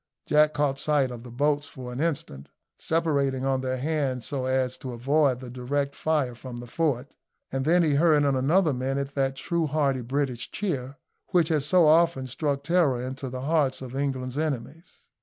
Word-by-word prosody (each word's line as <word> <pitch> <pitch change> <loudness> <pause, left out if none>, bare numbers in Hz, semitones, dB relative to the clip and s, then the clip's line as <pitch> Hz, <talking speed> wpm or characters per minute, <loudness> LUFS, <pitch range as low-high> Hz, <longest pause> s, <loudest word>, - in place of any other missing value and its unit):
Jack 150 0 +4
caught 140 -2 +1
sight 145 -4 +1
of 120 -1 -7
the 125 - -11
boats 145 +4 0
for 125 -3 -8
an 125 - -5
instant, 135 - -3 0.3
separating 140 -5 0
on 135 -1 +1
either 130 0 -2
hand 135 -3 -1
so 135 -1 -3
as 130 -1 0
to 130 -2 -7
avoid 135 +2 +2
the 125 - -8
direct 140 +3 -2
fire 150 -6 0
from 120 +1 -9
the 120 - -7
fort, 140 0 -1 0.4
and 135 0 -2
then 175 +3 +4
he 155 -3 +2
heard 150 0 +4
in 140 -1 +2
another 155 +5 +3
minute 135 +2 -2
that 135 -1 0
true 170 +3 -1
hearty 140 -3 +1
British 130 -1 -2
cheer, 140 -10 -3 0.3
which 175 -4 +2
has 150 -3 +1
so 180 0 +5
often 160 -3 +4
struck 140 +2 -2
terror 160 -6 +2
into 130 +1 -5
the 125 0 -5
hearts 145 -2 +1
of 130 0 -8
England's 135 -1 -2
enemies. 155 +2 -4
140 Hz, 185 wpm, -26 LUFS, 130-150 Hz, 0.4 s, so